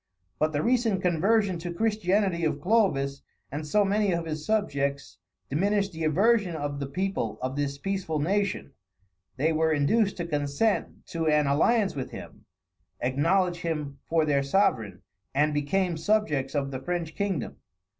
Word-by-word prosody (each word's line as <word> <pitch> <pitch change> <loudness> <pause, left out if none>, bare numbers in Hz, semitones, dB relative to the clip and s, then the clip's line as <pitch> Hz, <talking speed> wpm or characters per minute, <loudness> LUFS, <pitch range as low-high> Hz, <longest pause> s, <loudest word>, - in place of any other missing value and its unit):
But 155 +1 +2
the 145 -1 -1
recent 230 -6 +1
conversion 185 +2 +2
to 175 +1 -5
Christianity 195 -3 +1
of 155 -2 0
Clovis 145 -8 +1 0.3
and 150 +2 -4
so 205 +6 +3
many 205 0 +2
of 170 -1 -2
his 155 -1 -4
subjects, 140 -9 -1 0.3
diminished 200 +6 +1
the 160 -1 -4
aversion 195 +3 +3
of 145 -2 -3
the 140 - -3
people 140 - -2
of 130 +1 -3
this 140 -1 -2
peaceful 190 -1 -2
nation; 195 +1 -1 0.7
they 155 +4 +2
were 160 0 +2
induced 195 +8 +2
to 170 - -3
consent 150 +7 -1
to 165 -1 -2
an 150 -1 +3
alliance 190 +9 +2
with 130 -2 -4
him, - - -10 0.5
acknowledge 170 +8 +1
him 150 -5 -4
for 160 -1 +2
their 140 -2 +2
sovereign, 125 - +1 0.3
and 150 +2 +3
became 170 +4 0
subjects 155 -9 0
of 140 -1 -1
the 130 -1 -5
French 170 +1 -3
kingdom. 195 -8 -2
160 Hz, 155 wpm, -27 LUFS, 145-195 Hz, 0.7 s, so